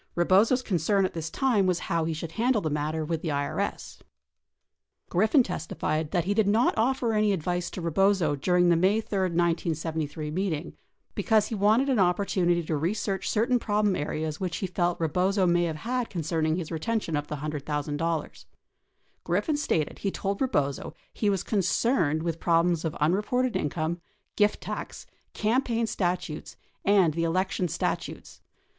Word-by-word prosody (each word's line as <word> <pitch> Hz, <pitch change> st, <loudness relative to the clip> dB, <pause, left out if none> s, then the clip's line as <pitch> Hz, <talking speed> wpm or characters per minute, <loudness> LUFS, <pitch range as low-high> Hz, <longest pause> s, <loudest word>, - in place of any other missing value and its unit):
Rebozo's 200 Hz, +9 st, +3 dB
concern 195 Hz, 0 st, +1 dB
at 185 Hz, -, -3 dB
this 165 Hz, -1 st, -4 dB
time 220 Hz, -2 st, +2 dB
was 180 Hz, -2 st, +2 dB
how 165 Hz, -1 st, -1 dB
he 165 Hz, -, -1 dB
should 160 Hz, +1 st, -6 dB
handle 235 Hz, +5 st, +1 dB
the 155 Hz, -6 st, -2 dB
matter 155 Hz, +2 st, -1 dB
Avith 160 Hz, 0 st, -2 dB
the -, -, -4 dB
IRS. 145 Hz, -1 st, -3 dB
30 -, -, -26 dB, 1.1 s
Griffin 220 Hz, -, +4 dB
testified 160 Hz, -4 st, -3 dB
that 175 Hz, +1 st, 0 dB
he 195 Hz, +4 st, 0 dB
did 210 Hz, -1 st, +2 dB
not 220 Hz, +4 st, +3 dB
offer 240 Hz, 0 st, +1 dB
any 215 Hz, -1 st, +3 dB
advice 175 Hz, -1 st, -1 dB
to 185 Hz, -, -7 dB
Rebozo 170 Hz, -2 st, +2 dB
during 175 Hz, +5 st, +2 dB
the 170 Hz, -, +5 dB
May 190 Hz, +6 st, +3 dB
3, 210 Hz, -3 st, -3 dB
1973, 165 Hz, -3 st, -1 dB
meeting 175 Hz, -2 st, -2 dB, 0.4 s
because 215 Hz, -2 st, +2 dB
he -, -, -4 dB
wanted 215 Hz, +6 st, +3 dB
an 260 Hz, -5 st, +2 dB
opportunity 180 Hz, -2 st, +2 dB
to 155 Hz, 0 st, -2 dB
research 195 Hz, +5 st, -1 dB
certain 240 Hz, +3 st, +2 dB
problem 210 Hz, -3 st, +1 dB
areas 155 Hz, 0 st, -3 dB
which 180 Hz, -3 st, -2 dB
he -, -, -2 dB
felt 175 Hz, -1 st, -1 dB
Rebozo 185 Hz, +4 st, +1 dB
may 175 Hz, 0 st, +3 dB
have 160 Hz, -2 st, -2 dB
had 240 Hz, +9 st, -2 dB
concerning 160 Hz, -2 st, -1 dB
his 175 Hz, -2 st, -5 dB
retention 170 Hz, +1 st, -2 dB
of 145 Hz, 0 st, -2 dB
the 150 Hz, -, -4 dB
$100,000. 150 Hz, +2 st, -3 dB, 0.8 s
Griffin 205 Hz, -, 0 dB
stated 160 Hz, -, -1 dB
he 200 Hz, -, -1 dB
told 195 Hz, +2 st, -3 dB
Rebozo 145 Hz, -, -1 dB, 0.2 s
he 210 Hz, -, 0 dB
Avas 195 Hz, -3 st, -1 dB
con 210 Hz, -, 0 dB
cerned 175 Hz, -, +1 dB
Avith 165 Hz, -1 st, -2 dB
problems 170 Hz, -1 st, +2 dB
of 160 Hz, -2 st, -2 dB
unreported 210 Hz, +10 st, +1 dB
income, 160 Hz, +3 st, -2 dB, 0.3 s
gift 210 Hz, 0 st, +2 dB
tax, -, -, -6 dB, 0.3 s
campaign 230 Hz, +1 st, +1 dB
stat 180 Hz, -4 st, -1 dB
utes, 155 Hz, -1 st, -8 dB, 0.3 s
and 190 Hz, -6 st, +4 dB
the 165 Hz, +2 st, -1 dB
election 185 Hz, +2 st, 0 dB
statutes. 165 Hz, +1 st, -4 dB
180 Hz, 165 wpm, -27 LUFS, 160-205 Hz, 1.1 s, the